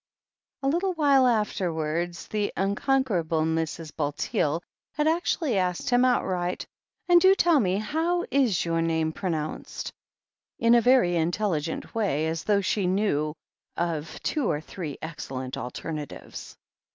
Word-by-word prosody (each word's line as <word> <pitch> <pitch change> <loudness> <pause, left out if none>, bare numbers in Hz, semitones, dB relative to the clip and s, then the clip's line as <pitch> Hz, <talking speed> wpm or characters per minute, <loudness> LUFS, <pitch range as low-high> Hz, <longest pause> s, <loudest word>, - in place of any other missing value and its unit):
A - - +1
little 355 +6 +1
while 280 -5 +4
afterwards 175 -6 -1
the 210 -1 -1
unconquerable 195 - +1
Mrs. 160 0 -2
Bulteel 150 +2 -1 0.3
had 300 +1 0
actually 320 - +1
asked 180 +4 -1
him 245 +1 +5
outright, 185 -8 0 0.4
"And 350 -1 +6
do 380 +2 +7
tell 340 -5 +4
me, 190 -5 +1
how 325 +10 0
is 250 -11 +2
your 165 0 0
name 160 -1 +1
pronounced?" 160 -5 -4 0.6
in 230 0 +4
a 240 - +6
very 245 -6 +4
intelli 175 0 0
gent 160 +2 -5
way, 195 -9 0
as 160 +1 -3
though 205 -1 +3
she 195 0 0
knew 170 -6 0 0.4
of 165 -2 -2
two 295 -7 0
or 145 - 0
three 155 -2 -7
excellent 130 -5 -5
alternatives. 145 +5 -7
185 Hz, 135 wpm, -26 LUFS, 160-250 Hz, 0.6 s, do